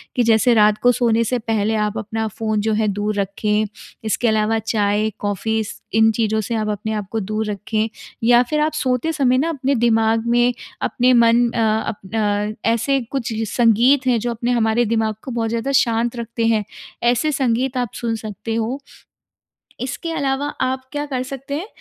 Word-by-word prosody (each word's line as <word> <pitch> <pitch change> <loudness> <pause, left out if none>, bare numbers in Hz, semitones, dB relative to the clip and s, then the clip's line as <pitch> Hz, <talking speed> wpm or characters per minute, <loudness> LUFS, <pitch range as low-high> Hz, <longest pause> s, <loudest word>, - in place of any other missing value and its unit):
कि 245 - +3
जैसे 230 +1 +4
रात 210 -1 +4
को 245 - +6
सोने 230 -1 +2
से 245 +2 -1
पहले 220 -1 0
आप 210 0 -1
अपना 220 +1 -3
फ़ोन 215 0 -2
जो 220 +1 0
है 215 0 +1
दूर 205 +1 -1
रखें, 210 +2 0 0.4
इसके 220 +2 0
अलावा 220 0 +2
चाय, 210 -1 0
कॉफ़ीज़ 210 +2 -2 0.2
इन 220 +1 +5
चीज़ों 220 -1 0
से 230 +2 -3
आप 215 -1 -1
अपने 210 +1 -3
आप 210 -2 -3
को 225 - -1
दूर 215 +2 -2
रखें। 215 +2 -2 0.3
या 240 +1 +6
फ़िर 300 +5 -2
आप 310 +1 +1
सोते 260 +1 0
समय 255 -5 +2
ना 315 +5 +1
अपने 275 -3 0
दिमाग 225 -1 +2
में, 240 +1 +3 0.3
अपने 255 +1 +2
मन 235 0 +4
अ, 235 - -3 0.3
अप 205 0 -8 0.5
अ, 225 - +2
ऐसे 270 +4 +1
कुछ 270 -4 -2 0.2
संगीत 240 +5 +3
हैं 245 -2 +3
जो 240 +2 -2
अपने 235 +1 -2
हमारे 235 0 +2
दिमाग 220 -1 0
को 260 - -6
बहुत 230 -2 -1
ज़्यादा 235 +4 -2
शांत 235 +1 0
रखते 230 -1 -3
हैं, 220 -2 +2 0.4
ऐसे 245 +5 +2
संगीत 260 -1 0
आप 245 -2 -1
सुन 230 -1 -2
सकते 220 +1 -5
हो। 230 +4 -2 1.0
इसके 265 +6 -4
अलावा 280 -2 -1
आप 260 0 -1
क्या 290 0 -3
कर 260 -3 -3
सकते 275 +2 -6
हैं 340 +7 -4
230 Hz, 185 wpm, -20 LUFS, 220-250 Hz, 1.0 s, को